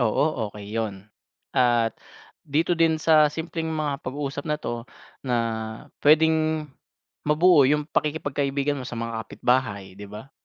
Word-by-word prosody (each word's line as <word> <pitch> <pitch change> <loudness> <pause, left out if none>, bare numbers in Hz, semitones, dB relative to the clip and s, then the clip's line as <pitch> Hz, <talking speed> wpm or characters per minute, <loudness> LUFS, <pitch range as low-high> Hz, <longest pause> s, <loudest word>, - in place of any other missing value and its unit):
Oo, 110 -3 +2 0.3
okey 105 -1 -9
'yun 110 -3 -1 0.6
at 120 -3 +3 0.5
dito 160 +4 +1
din 165 -1 +3
sa 155 -2 +5
simpleng 160 0 -4
mga 150 -3 -1
pag-uusap 140 +1 -4
na 150 -1 -2
to 120 -3 -4 0.4
na 125 -2 0 0.7
pwedeng 155 0 +4 0.6
mabuo 150 -2 +5
'yung 150 +1 +2
pakikipagkaibigan 145 -1 -1
mo 125 - -6
sa 120 - -6
mga 115 0 -3
kapitbahay, 100 -6 -1
'di 100 - -8
ba? 105 +7 -10
145 Hz, 130 wpm, -25 LUFS, 120-155 Hz, 0.7 s, sa